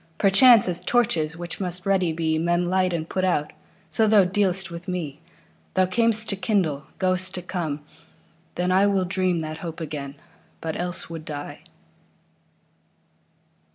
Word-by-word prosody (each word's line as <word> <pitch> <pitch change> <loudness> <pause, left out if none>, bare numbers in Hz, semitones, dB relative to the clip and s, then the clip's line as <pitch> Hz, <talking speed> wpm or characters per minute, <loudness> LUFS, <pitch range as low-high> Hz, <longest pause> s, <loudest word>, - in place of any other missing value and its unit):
Perchance, 205 +3 +6
as 175 -1 -2
torches, 170 -10 +1
which 175 0 -6
must 180 -1 -4
ready 190 -4 +2
be, 160 -1 0
Men 175 +1 +1
light 185 -1 +2
and 165 -2 -3
put 185 - -2
out, 155 -5 0 0.4
so 220 - +3
thou 210 -2 +6
dealst 190 -1 +1
with 170 +1 -8
me. 165 -6 -4 0.6
Thou 185 - +4
cam'st 220 +3 +1
to 200 - +2
kindle, 185 -7 0
goest 185 0 0
to 180 - -5
come: 165 -5 -3 0.7
then 180 +1 0
IWill 195 0 +3
dream 185 -2 0
that 155 0 -5
hope 165 -1 -6
again, 145 -3 -5 0.4
but 160 -1 -4
else 175 0 -3
would 165 -1 -7
die. 145 -2 -7
180 Hz, 150 wpm, -24 LUFS, 160-190 Hz, 0.7 s, Perchance